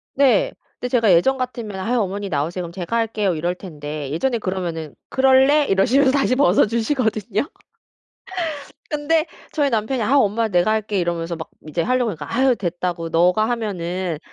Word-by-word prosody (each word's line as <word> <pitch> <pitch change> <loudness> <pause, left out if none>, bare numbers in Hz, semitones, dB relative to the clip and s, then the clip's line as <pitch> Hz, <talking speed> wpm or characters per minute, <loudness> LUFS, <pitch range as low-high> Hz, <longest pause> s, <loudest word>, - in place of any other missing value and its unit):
네. 280 - +3 0.3
근데 250 - -3
제가 230 -5 +4
예전 265 +11 +3
같으면 235 -5 -4
"아유 235 +6 0
어머니 200 -1 -2
나오세요. 165 +4 -2
그럼 170 - -7
제가 180 +5 -4
할게요." 210 -5 0
이럴 170 +3 -1
텐데 150 -5 -7
예전에 235 - 0
그러면은 175 -6 -4
"그럴래?" 265 +3 +4
이러시면서 255 +8 +3
다시 270 -2 +2
벗어 220 -8 +4
주시거든요. 230 - -1 1.4
근데 310 +2 +1 0.3
저희 290 -3 +1
남편이 230 +3 -1
"아 255 +7 +2
엄마 225 -1 +2
내가 180 +1 +2
할게." 215 -2 -1
이러면서 170 -1 -2
막 160 - -7 0.2
이제 165 +2 -1
하려고 250 +2 +1
하니까 155 +1 -7
아 260 0 +4
됐다고 175 -3 -3
너가 180 +6 +3
하면은 185 -7 -2
210 Hz, 375 characters per minute, -21 LUFS, 175-255 Hz, 1.4 s, 제가